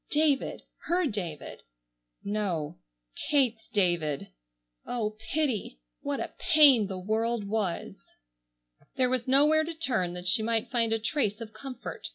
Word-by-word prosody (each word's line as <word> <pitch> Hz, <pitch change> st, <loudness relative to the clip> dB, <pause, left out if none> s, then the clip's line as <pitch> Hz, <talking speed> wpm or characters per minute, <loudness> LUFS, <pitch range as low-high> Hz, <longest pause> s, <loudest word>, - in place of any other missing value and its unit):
David, 295 Hz, -2 st, +1 dB, 0.2 s
her 355 Hz, +1 st, +2 dB
David—no, 150 Hz, -, -5 dB, 0.5 s
Kate's 245 Hz, -6 st, +2 dB
David! 175 Hz, -, 0 dB, 0.5 s
Oh, 215 Hz, -3 st, -3 dB, 0.2 s
pity! 255 Hz, -, -1 dB, 0.2 s
What -, -, -2 dB
a -, -, -5 dB
pain 275 Hz, -9 st, +6 dB
the 190 Hz, -1 st, -5 dB
world 220 Hz, +4 st, -1 dB
was! 200 Hz, -4 st, -2 dB, 1.0 s
There 255 Hz, -1 st, +2 dB
was 255 Hz, -1 st, -1 dB
nowhere 295 Hz, +4 st, +5 dB
to 330 Hz, +1 st, -5 dB
turn 225 Hz, -, 0 dB
that 180 Hz, 0 st, -5 dB
she 220 Hz, +5 st, +5 dB
might 225 Hz, 0 st, -1 dB
find 230 Hz, -2 st, +2 dB
a 225 Hz, -, +3 dB
trace 220 Hz, -2 st, -1 dB
of 220 Hz, -2 st, -8 dB
comfort. 255 Hz, +1 st, -7 dB
220 Hz, 130 wpm, -28 LUFS, 185-260 Hz, 1.0 s, pain